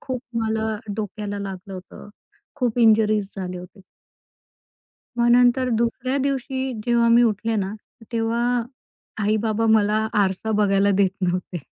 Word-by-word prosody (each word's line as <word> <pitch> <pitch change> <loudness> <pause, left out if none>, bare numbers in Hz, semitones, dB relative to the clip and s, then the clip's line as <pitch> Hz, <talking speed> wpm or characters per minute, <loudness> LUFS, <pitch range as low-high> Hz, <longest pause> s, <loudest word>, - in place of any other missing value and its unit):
खूप 255 -3 -4 0.2
मला 220 0 -1 0.2
डोक्याला 210 -1 -4
लागलं 195 -1 -7
होतं. 185 +2 -11 0.5
खूप 245 -3 -1
इंजरीज 215 -3 +3
झाले 180 -1 -5
होते. 180 +3 -12 1.4
मग 235 0 +3
नंतर 245 +1 +4
दुसऱ्या 240 +3 -1
दिवशी 265 -1 -2
जेव्हा 235 -1 +3
मी 235 +1 +6
उठले 225 0 0
ना, 195 -1 -2
तर 225 +2 -19
तेव्हा 230 +1 0 0.8
आई-बाबा 215 +1 +1
मला 215 +1 +1 0.2
आरसा 190 +3 -2
बघायला 200 0 +3
देत 195 -2 +4
नव्हते. 180 -1 -2
220 Hz, 130 wpm, -22 LUFS, 200-235 Hz, 1.4 s, मी